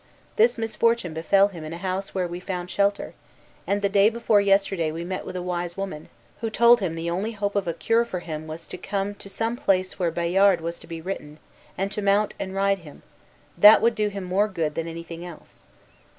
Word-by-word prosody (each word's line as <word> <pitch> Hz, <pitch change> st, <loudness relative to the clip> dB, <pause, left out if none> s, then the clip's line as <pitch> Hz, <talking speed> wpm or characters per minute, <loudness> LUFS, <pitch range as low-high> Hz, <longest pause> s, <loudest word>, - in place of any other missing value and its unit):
This 455 Hz, -, +4 dB
misfortune 225 Hz, -4 st, 0 dB
befell 195 Hz, +5 st, +3 dB
him 170 Hz, -5 st, -9 dB
in 155 Hz, +1 st, -6 dB
a -, -, -5 dB
house 190 Hz, +2 st, -4 dB
where 185 Hz, -2 st, 0 dB
we 175 Hz, +1 st, -6 dB
found 180 Hz, -1 st, -5 dB
shelter, 200 Hz, 0 st, 0 dB, 0.5 s
and 205 Hz, +1 st, 0 dB
the -, -, +4 dB
day 200 Hz, +1 st, +4 dB
before 225 Hz, -2 st, +2 dB
yesterday 195 Hz, -5 st, +2 dB
we 165 Hz, +2 st, -5 dB
met 185 Hz, +2 st, -5 dB
with 185 Hz, -, -6 dB
a 180 Hz, -, -3 dB
wise 175 Hz, -1 st, -3 dB
woman, 190 Hz, -6 st, -5 dB, 0.3 s
who 225 Hz, -, -2 dB
told 235 Hz, +2 st, +5 dB
him 180 Hz, -5 st, -2 dB
the 165 Hz, +1 st, -4 dB
only 200 Hz, +6 st, -2 dB
hope 205 Hz, -1 st, -3 dB
of 200 Hz, -3 st, 0 dB
a 170 Hz, -, 0 dB
cure 230 Hz, +6 st, +2 dB
for 210 Hz, -6 st, -5 dB
him 155 Hz, -2 st, -6 dB
was 155 Hz, +1 st, -8 dB
to -, -, -7 dB
come 200 Hz, 0 st, -2 dB
to 200 Hz, -, -11 dB
some 225 Hz, +3 st, -2 dB
place 185 Hz, -6 st, 0 dB
where 175 Hz, -2 st, +1 dB
Bayard 175 Hz, +3 st, +3 dB
was 170 Hz, +1 st, -5 dB
to -, -, -13 dB
be 165 Hz, -1 st, -7 dB
ridden, 155 Hz, -4 st, -6 dB, 0.4 s
and 195 Hz, +1 st, -1 dB
to 210 Hz, -, -4 dB
mount 200 Hz, +1 st, +2 dB
and 190 Hz, 0 st, -5 dB
ride 195 Hz, 0 st, +2 dB
him; 155 Hz, -4 st, -14 dB, 0.5 s
that 210 Hz, +1 st, +9 dB
would 230 Hz, +1 st, +3 dB
do 215 Hz, -2 st, 0 dB
him 200 Hz, -2 st, -5 dB
more 190 Hz, +3 st, +1 dB
good 165 Hz, -7 st, -2 dB
than 165 Hz, +1 st, -3 dB
anything 165 Hz, 0 st, -7 dB
else." 175 Hz, -3 st, -12 dB
195 Hz, 220 wpm, -24 LUFS, 170-205 Hz, 0.5 s, that